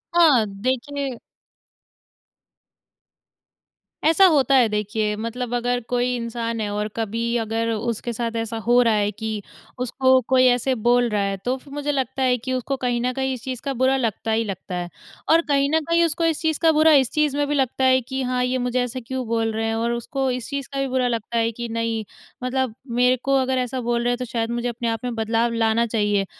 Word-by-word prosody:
हाँ, 300 -10 +6 0.2
देखिए 265 +3 -2 2.9
ऐसा 330 +5 +6
होता 280 -6 +4
है 250 -3 +5
देखिए 210 0 -1
मतलब 230 +3 -4
अगर 245 0 0
कोई 245 0 +1
इंसान 230 -1 -3
है 210 - -2
और 210 0 -1
कभी 225 0 -2 0.2
अगर 225 0 -1
उसके 230 +2 -3
साथ 230 0 -3
ऐसा 225 0 -3
हो 245 +1 +6
रहा 230 -2 +3
है 205 -1 +1
कि 215 0 -4 0.4
उसको 260 +1 +3
कोई 255 0 +6
ऐसे 250 +1 +2
बोल 245 0 +4
रहा 210 -2 0
है 195 0 -1
तो 250 +1 +1
फिर 275 +1 -15
मुझे 290 0 -2
लगता 265 -1 -1
है 250 -1 +3
कि 260 +2 -4
उसको 255 +2 -2
कहीं 245 -2 -1
न 250 +1 0
कहीं 265 0 -1
इस 250 - -8
चीज़ 255 -2 -5
का 275 - -1
बुरा 260 +1 +2
लगता 225 -2 -2
ही 225 +1 +2
लगता 190 -3 -6
है। 175 0 -4 0.4
और 330 +1 +6
कहीं 280 -1 +3
न - - +5
कहीं 335 0 +4
उसको 330 +1 -1
इस 325 -2 0
चीज़ 315 -2 0
का 325 -1 +4
बुरा 315 +1 +5
इस 245 - -7
चीज़ 300 -2 +1
में 290 - +2
भी 295 - 0
लगता 265 -1 0
है 260 0 +5
कि 265 +2 -4
हाँ, 250 0 0
ये 250 +1 0
मुझे 250 0 0
ऐसा 250 +1 -4
क्यों 260 -1 -3
बोल 225 0 0
रहे 225 +1 -2
हैं 225 - -1
और 230 +1 0
उसको 265 +3 -2
इस 250 0 -4
चीज़ 280 -1 -4
का 275 - -2
भी 275 - 0
बुरा 255 -1 +1
लगता 235 -1 -2
है 230 0 +2
कि 235 +1 -6
नहीं 230 -1 -1 0.4
मतलब 255 -2 -1 0.3
मेरे 250 +1 +4
को 275 0 +2
अगर 260 0 0
ऐसा 255 0 -2
बोल 240 0 0
रहे 245 - +1
हैं 245 - -1
तो 250 - -4
शायद 230 -1 -2
मुझे 240 +1 -2
अपने 235 0 -4
आप 225 0 -3
में 245 -2 -3
बदलाव 225 +1 0
लाना 230 0 +2
चाहिए। 205 -3 +1
245 Hz, 220 wpm, -22 LUFS, 230-265 Hz, 2.9 s, हाँ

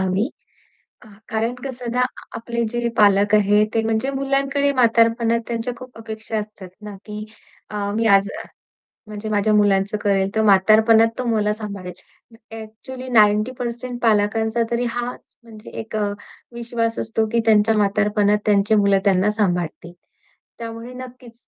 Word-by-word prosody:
हवी. 190 +6 0 0.8
आ - - -15 0.2
कारण 225 +2 -1
कसं 250 -3 -5
ना 250 - -1
आ 250 - -3
आपले 235 +1 -3
जे 240 0 -1
पालक 205 0 +4
आहेत, 210 +1 +3
ते 225 - +2
म्हणजे 225 +4 0
मुलांकडे 275 +1 0
म्हातारपणात 230 -1 +3
त्यांच्या 235 +1 -3
खूप 255 -2 -12
अपेक्षा 220 0 -6
असतात 210 -3 -9
ना, 210 -1 -8
की 210 0 -7 0.4
अ, 205 -1 -3
मी 225 +1 0
आज 200 -1 +4 0.8
म्हणजे 215 0 -7
माझ्या 215 0 +1
मुलांचं 205 0 +2
करेल, 195 -1 +2
तर 220 - +2
म्हातारपणात 220 +3 +5
तो 255 - -2
मला 215 -2 +1
सांभाळेल. 200 -4 -7 0.6
ॲक्चुअली 250 +4 -9
90% 240 +3 +1
पालकांचा 220 +1 +1
तरी 240 +1 0
हाच 245 +1 -4 0.2
म्हणजे 225 -1 -13
एक 225 0 -6
अ, 205 -1 -1 0.4
विश्वास 235 -1 -3
असतो, 225 0 -1
की 235 - +2
त्यांच्या 220 0 +4
म्हातारपणात 210 0 +2
त्यांची 205 +1 +3
मुलं 200 -2 +3
त्यांना 195 0 +3
सांभाळतील. 175 -5 -2 0.7
त्यामुळे 230 +1 -7
नक्कीच 250 -1 -11
220 Hz, 145 wpm, -21 LUFS, 205-235 Hz, 0.8 s, म्हातारपणात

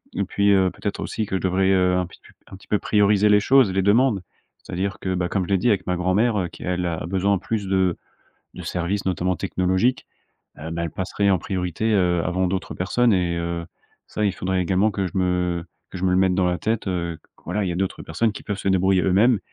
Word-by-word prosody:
et 100 - 0
puis, 100 +2 +1
heu, 95 -2 +4
peut-être 100 - -5
aussi 110 - -3
que 95 - -3
je - - -1
devrais, 95 +1 +1
heu, 90 -1 +3
un 90 - 0
pitu 90 - -17
un - - -11
petit 95 - -16
peu 105 - +1
prioriser 105 0 +3
les 105 0 +6
choses, 130 -2 +4
les 95 - +2
demandes. 105 +1 +3 0.4
C'est - - -11
à - - -2
dire 100 +3 -2
que, 95 - -2
bah, 90 -1 -1
comme 95 - 0
je - - -11
l'ai 100 - +3
dit 105 +7 +1
avec 100 -5 0
ma 90 - +1
grand-mère, 100 +5 +1
heu, 90 - -1
qui - - -12
elle 90 0 -1
a 80 -2 -3
besoin 95 +3 +1
plus 105 +1 -3
de 95 -2 +1 0.6
de - - -8
services 90 +3 -2
notamment 90 0 0
technologiques, 95 +11 0 0.5
heu, 80 +2 -7
bah, 85 0 -3
elle 85 - -3
passerait 100 +3 -1
en 95 - +3
priorité, 90 +4 -2
heu, 90 -3 +2
avant 95 +1 0
d'autres 95 0 -3
personnes, 115 +5 +1
et 90 -2 +1
heu, 85 0 -3 0.4
ça 105 - -2
il 100 - +2
faudrait 95 0 -1
également 95 +4 +2
que 95 -1 -2
je 90 - -7
me 90 -2 0 0.3
que 90 - -7
je 95 - -3
me 95 - +3
le 90 - +2
mette 95 -1 +3
dans 90 -1 +2
la 90 0 0
tête, 110 -2 -2
heu, 85 -3 -3
q - - -31 0.2
voilà 105 - -1
il - - -1
y - - -1
a - - -4
d'autres 95 +1 -2
personnes 105 +7 0
qui - - -9
peuvent 105 -1 -4
se 100 - -2
débrouiller 95 0 +3
eux-mêmes 105 +5 +4
95 Hz, 250 wpm, -23 LUFS, 90-100 Hz, 0.6 s, les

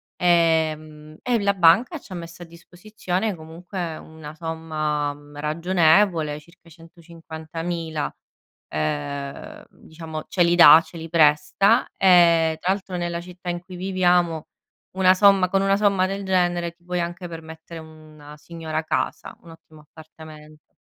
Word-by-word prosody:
Ehm, 155 -3 0
e 240 -4 0
la 200 0 +2
banca 195 - +3
ci 190 - -13
ha - - -6
messo 170 +1 -9
a - - -11
disposizione 180 +3 -5
comunque 165 +1 -7
una 155 -1 -11
somma, 155 -3 -3
mhmm, 145 0 -16
ragionevole, 160 0 +2
circa 170 +2 -21
150000, 165 -1 -7 0.6
ehm, 75 - -5
diciamo 160 -1 -9
ce 180 - +2
li 170 0 +2
dà, 165 -2 +9
ce - - -16
li 165 0 -8
presta. 165 +9 +3
E 170 -3 +4
tra 185 - +1
l'altro, 190 -2 -7
nella 175 -1 -3
città 180 0 -9
in 175 0 -3
cui 185 0 -12
viviamo, 180 -3 0 0.5
una 185 -1 +5
somma 195 -2 +4
con 195 0 +1
una 195 0 +2
somma 200 -3 +2
del 195 +1 -5
genere 175 -2 0
ti 170 +1 -33
puoi 180 0 -3
anche 175 +1 -5
permettere 160 0 -10
una 155 -1 -14
signora 160 0 -5
casa, - - -3
un 170 - -16
ottimo 155 -1 -17
appartamento. 155 0 -15
165 Hz, 140 wpm, -22 LUFS, 155-180 Hz, 0.6 s, dà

